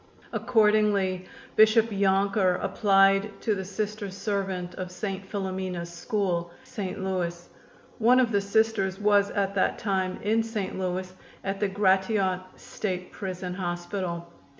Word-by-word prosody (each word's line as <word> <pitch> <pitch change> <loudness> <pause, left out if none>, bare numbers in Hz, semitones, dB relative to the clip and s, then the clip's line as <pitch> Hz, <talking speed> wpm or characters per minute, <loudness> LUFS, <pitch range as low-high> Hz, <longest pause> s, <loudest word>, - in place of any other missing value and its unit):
Accordingly, 210 -5 +2 0.3
Bishop 220 +1 +5
Yonker 195 -1 +2
applied 195 0 +3
to 220 - +1
the 190 -2 -3
Sister 205 +1 -4
servant 190 -2 -3
of 185 -1 -5
St. 195 +1 -5
Philomena's 185 -3 -3
School, 175 -3 -1
St. 195 -2 -5
Louis. 175 -2 -2 0.5
One 245 +3 +5
of 245 -3 +3
the 200 -2 +2
Sisters 200 -2 +1
was 205 -1 +4
at 200 -1 -1
that 195 - +1
time 190 -3 -1
in 220 +2 +2
St. 220 -4 -3
Louis 185 0 -3 0.3
at 195 0 -3
the 205 - +2
Gratiot 190 -1 +2 0.2
State 185 -3 -5
Prison 185 -2 -5
Hospital. 175 -1 -3
195 Hz, 125 wpm, -27 LUFS, 185-210 Hz, 0.5 s, Bishop